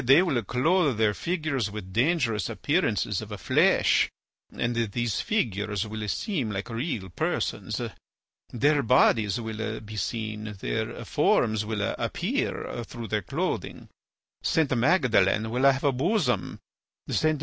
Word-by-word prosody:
They 135 +8 +6
will 140 -10 +1
clothe 140 - +2
their 110 -2 +3
figures 155 - -1
with 100 -3 -8
dangerous 120 - +1
appearances - - 0
of - - -7
flesh, - - +3 0.4
and 120 0 -2
these 115 -1 -1
figures 105 - -1
will 110 0 -5
seem 140 - -1
like 100 +3 -4
real 115 - -3
persons. 85 - -2 0.7
Their 145 +4 +3
bodies 110 -4 +3
will 110 -1 -4
be 110 0 -9
seen; 110 0 -3
their - - -3
forms 110 -1 +2
will 105 -2 -2 0.2
appear 120 - -2
through 115 0 -8
their 105 -1 0
clothing. - - -3 0.5
St. 155 -5 +1
Magdalen 115 - +3
will 130 +3 +5
have 135 +1 -3
a 140 - +4
bosom. 150 - 0 0.5
St. 155 -1 +1
115 Hz, 125 wpm, -27 LUFS, 105-140 Hz, 0.7 s, They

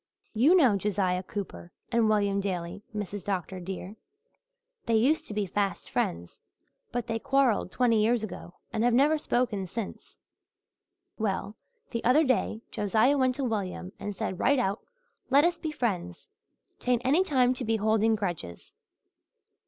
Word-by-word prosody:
You 265 +11 +5
know 255 - +5
Josiah 190 -2 0
Cooper 190 -2 -7 0.2
and 230 -2 +3
William 200 -2 +2
Daley, 180 -1 -4
Mrs. 205 -2 -5
Dr. 190 -1 -3
dear. 185 +2 -6 0.9
They 230 - +3
used 265 +8 +2
to - - -6
be 210 -1 0
fast 195 0 -2
friends 85 +1 -2 0.5
but 245 -2 -2
they 225 0 -2
quarrelled 265 -7 +2
twenty 230 -3 +3
years 230 +1 +2
ago 185 -4 -7 0.2
and 220 - 0
have 240 -1 +3
never 300 +4 +4
spoken 235 -9 -1
since. 215 +2 -7 1.0
Well, 205 0 -2 0.4
the 230 - -3
other 265 +7 +5
day 255 -5 0
Josiah 220 +5 +2
went 260 -2 +2
to 275 - -3
William 200 -6 -3
and 205 -1 -5
said 180 0 -3
right 285 - +3
out, 200 -4 -1 0.5
'Let 280 +4 +5
us 345 -1 +1
be 315 - -3
friends. 185 - -3 0.5
'Tain't 245 -1 0
any 300 +8 +4
time 255 -7 +3
to 255 - -4
be 225 -1 +1
holding 220 +1 +2
grudges.' 175 - -5
220 Hz, 155 wpm, -28 LUFS, 195-250 Hz, 1.0 s, You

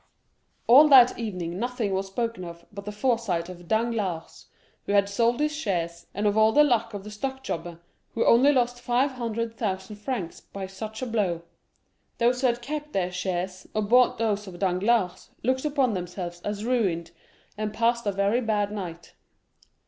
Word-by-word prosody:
All 275 +6 +8
that 255 -4 +7
evening 180 -6 -4
nothing 240 -4 -2
was 190 +1 -1
spoken 230 0 -3
of 170 -1 -9
but 200 0 -8
the 210 - -4
foresight 210 -7 0
of 175 -1 -11
Danglars, 220 -7 -2 0.4
who 200 - 0
had 200 -1 +4
sold 230 +4 +1
his 300 0 0
shares, 170 - -3
and 205 - -1
of 205 - +3
the 220 +7 +5
luck 230 -5 +1
of 200 - -6
the 210 - -9
stock 265 +5 -4
jobber, 170 -5 -5 0.4
who 230 - +1
only 260 +5 +6
lost 245 -2 +1
five 245 +3 +1
hundred 230 -2 -3
thousand 195 -1 -3
francs 210 -6 -4
by 195 -1 -7
such 215 +5 -7
a - - 0
blow. 200 -8 -1 0.7
Those 245 +2 +2
who 260 - +4
had 240 0 -1
kept 300 +3 -5
their 180 -2 0
shares, 185 0 -3
or 215 - +1
bought 245 +4 +4
those 210 -2 -1
of 180 -2 -9
Danglars, 185 +1 +1
looked 260 +4 0
upon 275 -6 +1
themselves 175 -1 -5
as 205 +2 -4
ruined, 190 -10 0 0.4
and 215 0 -3
passed 235 +1 +1
a - - +3
very 200 +5 +1
bad 210 -3 0
night. 175 -5 -7
210 Hz, 175 wpm, -26 LUFS, 190-240 Hz, 0.7 s, All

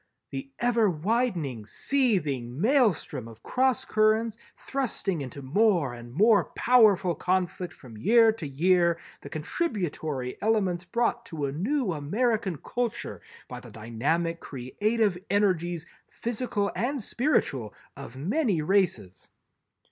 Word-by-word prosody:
"_The 135 0 -5
ever 235 -3 +3
widening 175 - -1
seething 145 - 0
maelstrom 210 - +2
of 115 -1 -14
cross 260 -2 +1
currents 215 +1 +2 0.2
thrusting 220 - -2
into 135 +1 -7
more 170 - +2
and 120 0 -10
more 210 - +4
powerful 205 -7 +5
conflict 180 +1 -1
from 115 -5 -13
year 225 - +6
to 200 -9 -6
year 170 +4 +3 0.2
the - - -9
contributory 155 - -3
elements 195 -5 +1
brought 235 +5 0
to 155 -4 -3
a 135 - -2
new 210 - 0
American 200 - 0
culture 240 - -3 0.3
by 125 - -7
the 125 -1 -12
dynamic 140 +11 -1
creative 200 - -1
energies, 175 -5 +1 0.2
physical 230 -3 -2
and 270 +4 -1
spiritual, 140 - 0 0.2
of 120 - -9
many 200 - 0
races_." 175 - 0
185 Hz, 115 wpm, -27 LUFS, 145-225 Hz, 0.3 s, year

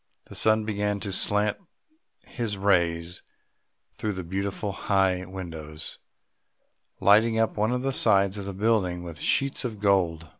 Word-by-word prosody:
The - - -13
sun 110 0 +3
began 105 -1 -1
to 100 +1 -4
slant 105 +2 +2 0.7
his 115 -5 -4
rays 85 -3 +1 0.7
through 105 -1 -3
the 95 -1 -5
beautiful 100 +3 -3
high 95 -2 +1
windows, 80 -4 -7 1.0
lighting 110 +3 +5
up 115 0 +1
one 110 +2 +1
of 125 0 -1
the 135 0 0
sides 100 -4 +3
of 100 - -6
the 100 - -5
building 95 -4 +1
with 85 -3 -8
sheets 140 - +1
of 115 -5 -4
gold. 90 -5 +1
100 Hz, 145 wpm, -26 LUFS, 90-110 Hz, 1.0 s, lighting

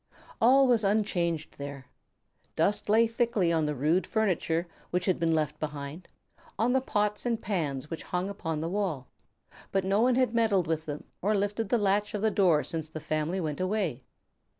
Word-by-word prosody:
All 265 +4 +6
was 240 -4 +3
unchanged 175 -7 0
there. 140 -2 -7 0.7
Dust 205 +1 +1
lay 225 +2 +5
thickly 225 -6 +1
on 160 -2 +1
the 150 - -2
rude 155 +7 +1
furniture 180 -6 0 0.2
which 180 +1 -1
had 185 - +1
been 165 -1 +2
left 150 -1 -1
behind, 150 +3 -6 0.5
on 230 +4 +2
the 265 - +3
pots 210 -4 0
and 235 -2 0
pans 155 - -3
which 165 - -4
hung 180 +1 -2
upon 165 -6 -3
the 165 - -2
wall, 175 -9 -2 0.6
but 195 -1 0
no 195 +3 +2
one 250 +1 +4
had 255 -2 +2
meddled 220 -6 +2
with 160 -1 -2
them 150 0 -5 0.2
or 210 +2 +2
lifted 205 +1 -1
the 240 - +3
latch 205 +1 +1
of 210 - -3
the 220 - +3
door 180 -7 +3
since 160 -2 -4
the 155 - -6
family 155 +4 -1
went 155 -4 -3
away. 185 - -1
185 Hz, 185 wpm, -29 LUFS, 155-210 Hz, 0.7 s, All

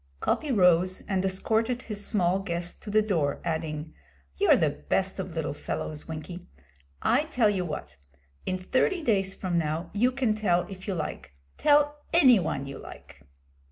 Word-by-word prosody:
Coppy 300 - 0
rose 185 -3 +4
and 190 -2 -1
escorted 220 +6 0
his 205 -2 -4
small 185 -3 +1
guest 175 -2 -3
to - - -8
the 215 +1 +3
door, 160 -9 0
adding 160 -1 -3 0.4
'You're - - +5
the - - +2
best 185 - -1
of 185 -3 -5
little 160 -3 -2
fellows, 150 +1 -5
Winkie. 165 +3 -7 0.6
I 260 +7 +3
tell 240 -9 +2
you 190 -3 -1
what. 150 - -6 0.5
In 185 - 0
thirty 260 - 0
days 195 -6 +1
from 175 -3 -1
now 160 +2 -2
you 240 +5 +3
can 255 -4 +1
tell 180 -5 +1
if 190 0 -9
you 195 - -1
like 155 - -5 0.3
tell 295 0 +4
any 260 - +6
one 140 -6 -2
you 135 -1 -7
like.' 70 - -12
190 Hz, 165 wpm, -27 LUFS, 165-220 Hz, 0.6 s, any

